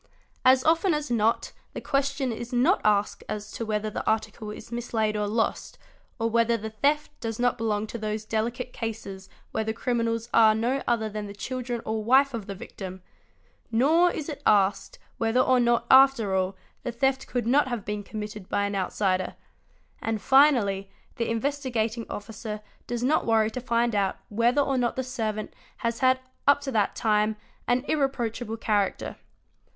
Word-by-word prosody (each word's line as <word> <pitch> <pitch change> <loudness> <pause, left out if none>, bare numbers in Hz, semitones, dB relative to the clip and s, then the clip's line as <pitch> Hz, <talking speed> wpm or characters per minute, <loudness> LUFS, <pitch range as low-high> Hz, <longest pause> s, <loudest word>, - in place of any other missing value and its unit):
As 255 0 +6
often 330 +2 +3
as 300 -3 -3
not 225 -1 +1 0.2
the - - -4
question 275 -2 0
is 235 +1 -6
not 260 +11 +3
asked 205 -1 +1
as 210 0 -5
to 230 - -5
wehiehbas 215 0 -1
the - - -4
article 220 0 -1
is 210 - -9
mislaid 225 -2 -1
or 210 0 0
lost, 220 +2 -1 0.4
or 225 -2 0
whether 230 0 +2
the 220 0 -6
theft 290 +7 +1
does 225 -2 -4
not 245 0 +2
belong 215 -2 -1
to 235 +2 -7
those 215 0 -3
delicate 235 +3 -2
cases 210 -4 -6 0.2
where 220 - -1
the 220 0 -2
criminals 230 -1 -1
are 220 -1 +6
no 245 +5 0
other 230 -2 +1
than 210 -1 -5
the 200 - -9
children 245 +1 -4
or 220 0 -2
wife 265 +4 +4
of 225 -4 -5
the 200 - -5
victim; 190 -1 -8 0.7
nor 310 +10 +4
is 305 -4 -4
it 300 - -6
asked 195 -1 +2 0.2
whether 225 +2 +2
or 255 0 +4
not, 240 -1 +2
after 260 -7 +6
all, 190 0 0 0.3
the 245 - -3
theft 265 +2 0
could 245 -2 -2
not 265 +4 +3
have 240 -5 -4
been 210 0 -3
committed 210 -1 -7
by 205 - +1
an 200 0 -1
outsider; 185 -1 0 0.7
and 225 -1 -1
finally 235 -8 +4 0.3
the 230 - -1
Investigating 235 -2 -1
Officer 210 0 -6 0.3
does 240 0 -3
not 290 +2 +2
worry 220 -1 +3
to 255 - -5
find 235 -1 +1
out 200 -2 +1
whether 235 +6 +2
or 270 -2 0
not 240 -2 0
the 260 - -1
servant 220 -4 -3 0.2
has 230 -1 -2
had 260 0 +4 0.3
up 285 0 +6
to 280 -1 -4
that 210 -4 +1
time 215 -1 +2 0.3
an 250 +2 +1
irreproachable 245 -6 -1
character. 205 -3 0
230 Hz, 175 wpm, -26 LUFS, 215-255 Hz, 0.7 s, As